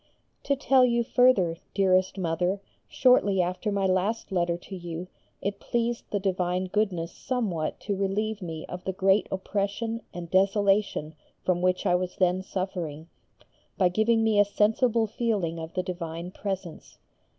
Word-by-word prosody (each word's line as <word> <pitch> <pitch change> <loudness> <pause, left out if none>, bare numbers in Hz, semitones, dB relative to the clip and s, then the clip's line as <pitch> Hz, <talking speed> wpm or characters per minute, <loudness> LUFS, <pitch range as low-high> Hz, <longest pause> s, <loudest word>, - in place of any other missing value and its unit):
To 280 - +2
tell 265 -1 +4
you 235 -1 +3
further, 225 -9 +3 0.2
dearest 185 -1 +3
Mother, 180 +2 0 0.3
shortly 205 -7 +4
after 180 +4 0
my 200 -1 0
last 190 +5 0
letter 175 -2 +1
to 190 +2 -9
you 175 -1 -6 0.4
it 200 +1 -2
pleased 235 0 -1
the 205 - -1
divine 185 -1 0
Goodness 185 -4 -1
somewhat 200 -12 -2
to 200 - -2
relieve 205 +2 -1
me 160 -3 -5
of 180 0 -7
the 190 - -2
great 195 +1 +3
oppression 205 +4 -2
and 175 -1 -7
desolation 195 -4 +2 0.3
from 180 -1 +1
which 185 0 +1
I - - +3
was 180 0 -1
then 185 0 +2
suffering, 175 -5 -4 0.7
by 185 -2 +4
giving 225 +4 +2
me 220 -2 +3
a - - +8
sensible 220 +3 +2
feeling 205 -7 -1
of 160 +2 -8
the 185 - 0
divine 175 -1 -5
presence. 190 -4 -6
190 Hz, 150 wpm, -27 LUFS, 180-210 Hz, 0.7 s, a